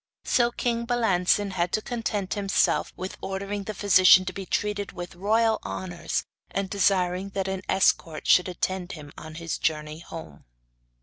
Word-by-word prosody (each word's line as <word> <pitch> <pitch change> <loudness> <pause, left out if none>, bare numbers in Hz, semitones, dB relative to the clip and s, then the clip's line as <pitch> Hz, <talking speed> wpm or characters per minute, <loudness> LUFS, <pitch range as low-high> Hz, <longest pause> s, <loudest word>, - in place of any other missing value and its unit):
So 240 -1 +2
king 235 -1 -1
Balancin 205 -4 +2
had 175 -1 -1
to 215 - +1
content 215 -5 -2
himself 200 -2 +1
with 185 +1 -6
ordering 195 +1 -4
the 215 - -5
physician 185 -2 +6
to 185 - -4
be 195 0 -7
treated 205 -1 -2
with 175 -2 -7
royal 220 +5 +2
honours, 175 -2 -3 0.3
and 195 0 -2
desiring 190 -1 +1
that 195 -1 -1
an 190 -1 -3
escort 165 -4 +2
should 180 0 +5
attend 185 +1 -3
him 150 -3 -10
on 155 0 -10
his 165 0 -4
journey 155 0 -2
home. 160 - -10
190 Hz, 160 wpm, -26 LUFS, 175-205 Hz, 0.3 s, physician